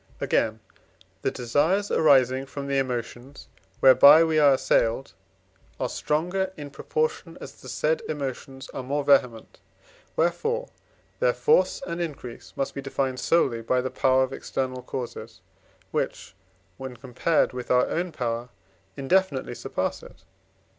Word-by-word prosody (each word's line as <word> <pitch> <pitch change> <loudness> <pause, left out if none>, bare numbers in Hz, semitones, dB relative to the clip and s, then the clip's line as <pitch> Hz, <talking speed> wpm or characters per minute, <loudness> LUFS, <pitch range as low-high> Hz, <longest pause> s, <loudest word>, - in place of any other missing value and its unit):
Again, 110 0 0 0.6
the - - +1
desires 155 - 0
arising 135 -3 +4
from 140 0 -6
the 140 0 0
emotions 125 +1 -5 0.3
whereby 140 +4 +8
we 160 -1 +2
are 145 -2 +6
assailed 130 -1 +1 0.7
are - - 0
stronger, 180 +5 -1
in 145 -2 -8
proportion 155 +4 -3
as - - -9
the 130 - -10
said 155 +5 0
emotions 135 -2 -5
are - - -6
more 140 +3 -2
vehement; 125 -5 +2 0.6
wherefore 455 - 0 0.5
their - - +3
force 455 - +2
and 170 -5 -4
increase 140 -8 -7
must 135 - -2
be 140 - -5
defined 135 -1 -2
solely 130 -9 +2
by 125 +3 +1
the 130 +1 -3
power 130 0 +3
of 130 0 -4
external 130 -1 -3
causes, 115 -3 -7 0.5
which, 90 - -3 0.4
when 130 -2 -8
compared 130 +6 0
with 125 -1 -6
our 125 0 +4
own 175 +1 -2
power, 120 -4 -3 0.5
indefinitely 140 0 +1
surpass - - -3
it - - -12
(IV. - - -31
135 Hz, 140 wpm, -25 LUFS, 125-155 Hz, 0.7 s, whereby